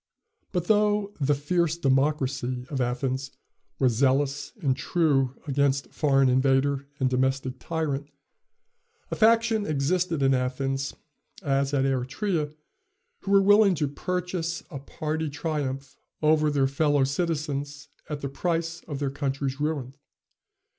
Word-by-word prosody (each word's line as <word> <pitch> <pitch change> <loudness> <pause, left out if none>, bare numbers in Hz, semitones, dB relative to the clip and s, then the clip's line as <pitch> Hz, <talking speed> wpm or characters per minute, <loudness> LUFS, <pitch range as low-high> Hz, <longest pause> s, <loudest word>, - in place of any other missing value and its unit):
But 180 -3 -1
though 210 0 +2
"the 145 +1 +3
fierce 170 +3 0
democracy" 135 -3 0
of 135 -3 -1
Athens 130 +2 -1 0.5
was 130 -3 +3
zealous 140 +3 +1
and 135 -8 +1
true 135 -4 +1
against 140 -2 0
foreign 135 -3 +3
invader 135 +2 +2
and 130 - +2
domestic 130 0 0
tyrant, 150 -4 -3 1.0
a - - -1
faction 225 -1 +3
existed 155 +2 0
in 135 0 +4
Athens, 135 +1 -1 0.5
as 140 -1 +1
at 135 -2 +1
Eretria, 145 - -1 0.7
who - - -8
were 195 0 +6
willing 205 -1 +6
to 150 -2 0
purchase 175 +2 -3
a 140 - -5
party 155 +3 -3
triumph 140 -3 -3 0.3
over 155 0 +4
their 140 -2 +2
fellow 145 +1 +2
citizens 145 -1 -2 0.2
at 150 -2 -4
the 140 - -2
price 165 +3 -2
of 145 -4 -4
their 140 -1 -2
country's 135 -1 -2
ruin. 145 -4 -2
145 Hz, 125 wpm, -26 LUFS, 135-160 Hz, 1.0 s, were